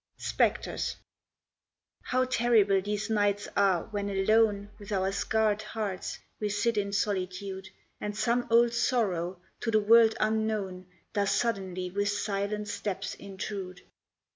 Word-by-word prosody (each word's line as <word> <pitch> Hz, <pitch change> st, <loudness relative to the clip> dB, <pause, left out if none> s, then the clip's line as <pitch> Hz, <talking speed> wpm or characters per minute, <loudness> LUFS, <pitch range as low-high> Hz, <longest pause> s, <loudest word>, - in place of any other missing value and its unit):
SPECTRES -, -, 0 dB, 1.1 s
How 255 Hz, 0 st, +1 dB
terrible 230 Hz, -6 st, +3 dB
these 205 Hz, +1 st, -2 dB
nights 205 Hz, -1 st, +1 dB
are 190 Hz, -4 st, +3 dB
when 205 Hz, -1 st, -2 dB
alone 205 Hz, +1 st, +2 dB
With 205 Hz, 0 st, -10 dB
our 190 Hz, -1 st, +1 dB
scarred 215 Hz, +1 st, +1 dB
hearts, 210 Hz, -3 st, -4 dB, 0.2 s
we 210 Hz, -, -1 dB
sit 210 Hz, +3 st, +1 dB
in 200 Hz, -1 st, -1 dB
solitude, 190 Hz, -1 st, -2 dB, 0.3 s
And 210 Hz, 0 st, -4 dB
some 235 Hz, +3 st, +1 dB
old 235 Hz, +1 st, +5 dB
sorrow, 190 Hz, -8 st, 0 dB, 0.2 s
to 230 Hz, -, -2 dB
the 215 Hz, -1 st, +4 dB
world 225 Hz, +1 st, +6 dB
unknown, 215 Hz, -4 st, -1 dB, 0.3 s
Does 200 Hz, -1 st, +1 dB
suddenly 185 Hz, -5 st, -1 dB
with 205 Hz, +2 st, 0 dB
silent 205 Hz, 0 st, -2 dB
steps 205 Hz, -1 st, -3 dB
intrude. 190 Hz, -2 st, -6 dB
205 Hz, 125 wpm, -29 LUFS, 195-220 Hz, 1.1 s, world